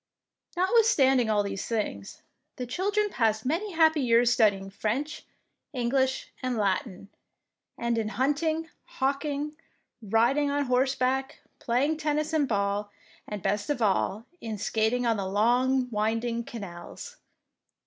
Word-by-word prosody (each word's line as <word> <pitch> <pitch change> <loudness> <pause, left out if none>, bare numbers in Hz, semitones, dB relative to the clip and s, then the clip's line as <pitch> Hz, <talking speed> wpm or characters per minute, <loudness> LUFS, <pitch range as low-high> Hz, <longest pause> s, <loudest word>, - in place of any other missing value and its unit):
Notwithstanding 350 - +4
all 210 -1 +2
these 200 0 -4
things, 205 - -4 0.3
the 250 - -4
children 405 - 0
passed 220 - +1
many 350 +9 -1
happy 320 -2 +4
years 240 -1 +4
studying 200 -5 +2
French, 240 +9 -3 0.5
English, 260 +1 0
and 255 -2 -1
Latin, 200 -1 -1 0.7
and 235 -1 0
in 220 - -1
hunting, 310 +7 0 0.3
hawking, 285 +2 -1 0.5
riding 235 +7 +2
on 285 0 0
horseback, 265 +1 0 0.2
playing 275 +6 +1
tennis 305 0 -1
and 300 -3 +2
ball, 205 -1 -1 0.4
and, 210 -3 -6
best 205 +4 -1
of 290 - 0
all, 210 0 +1 0.2
in 220 -2 -4
skating 220 +4 0
on 230 -2 +2
the 195 -1 -2
long 250 +6 +2
winding 230 +2 -1
canals. 205 - -9
245 Hz, 125 wpm, -27 LUFS, 215-290 Hz, 0.7 s, Notwithstanding